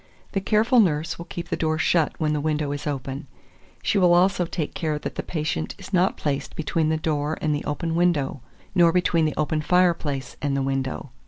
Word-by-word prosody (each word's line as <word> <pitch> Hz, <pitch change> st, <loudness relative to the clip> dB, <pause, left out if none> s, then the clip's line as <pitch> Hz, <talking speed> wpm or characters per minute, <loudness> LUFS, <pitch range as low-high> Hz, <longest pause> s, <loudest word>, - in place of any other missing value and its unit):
The 195 Hz, -, -1 dB
careful 220 Hz, +5 st, +3 dB
nurse 165 Hz, -4 st, +1 dB
will 170 Hz, -, -6 dB
keep 175 Hz, -1 st, -6 dB
the -, -, 0 dB
door 155 Hz, -1 st, 0 dB
shut 165 Hz, 0 st, +2 dB
when 155 Hz, -2 st, +1 dB
the 150 Hz, -, -1 dB
window 150 Hz, -1 st, -1 dB
is 145 Hz, +1 st, -4 dB
open; 140 Hz, +1 st, -4 dB, 0.6 s
she 200 Hz, -, +2 dB
will 175 Hz, -2 st, +5 dB
also 180 Hz, 0 st, +3 dB
take 165 Hz, -3 st, -3 dB
care 155 Hz, -2 st, -1 dB
that -, -, -5 dB
the -, -, -3 dB
patient 150 Hz, -, -3 dB
is -, -, -11 dB
not 185 Hz, +1 st, +3 dB
placed 140 Hz, -2 st, -2 dB
between 160 Hz, 0 st, 0 dB
the 160 Hz, -, +1 dB
door 155 Hz, -1 st, -1 dB
and 155 Hz, -1 st, 0 dB
the 145 Hz, -, -2 dB
open 165 Hz, +3 st, -2 dB
window, 165 Hz, -6 st, +1 dB, 0.3 s
nor 175 Hz, -3 st, +5 dB
between 170 Hz, -2 st, +2 dB
the 155 Hz, -, -2 dB
open 155 Hz, 0 st, 0 dB
fireplace 165 Hz, -5 st, +1 dB
and 140 Hz, -1 st, 0 dB
the 135 Hz, -, 0 dB
window. 135 Hz, -1 st, -2 dB
155 Hz, 205 wpm, -24 LUFS, 145-175 Hz, 0.6 s, will